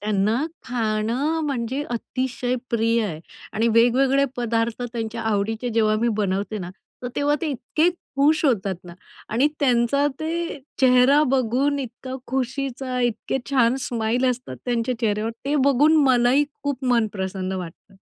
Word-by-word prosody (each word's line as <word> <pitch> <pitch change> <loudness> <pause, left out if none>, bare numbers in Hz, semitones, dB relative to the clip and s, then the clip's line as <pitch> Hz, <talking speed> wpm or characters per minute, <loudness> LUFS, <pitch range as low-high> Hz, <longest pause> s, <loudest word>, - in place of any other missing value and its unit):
त्यांना 215 +6 +1 0.2
खाणं 235 +6 -1
म्हणजे 260 +1 -2
अतिशय 250 +1 -2 0.2
प्रिय 230 0 +2
आहे 160 -7 -4 0.3
आणि 225 +2 +1
वेगवेगळे 260 +4 +4
पदार्थ 230 0 -1
त्यांच्या 230 -1 -4
आवडीचे 220 +2 -1
जेव्हा 215 -1 +3
मी 235 - +2
बनवते 205 +1 -1
ना, 180 -2 -6 0.3
तर 245 - -3
तेव्हा 290 +1 +2
ते 330 - -2
इतके 290 +6 +1 0.3
खुश 305 +3 +3
होतात 200 -8 +1
ना 175 -1 -10 0.3
आणि 250 +7 +2
त्यांचा 260 +2 +3
ते 335 0 -3 0.2
चेहरा 260 +3 +5
बघून, 265 +3 +1
इतका 255 0 -6
खुशीचा, 260 0 -2
इतके 240 +2 -1
छान 250 -2 +3
स्माईल 235 +2 0
असतात 245 - -6
त्यांच्या 240 0 -1
चेहऱ्यावर. 215 -1 0
ते 290 +2 +1
बघून 290 +4 +5
मलाही 255 +2 +4 0.2
खूप 280 -2 -3
मन 235 -3 +3
प्रसन्न 190 -1 -3
वाटतं. 185 +2 -8
245 Hz, 140 wpm, -23 LUFS, 220-270 Hz, 0.3 s, चेहरा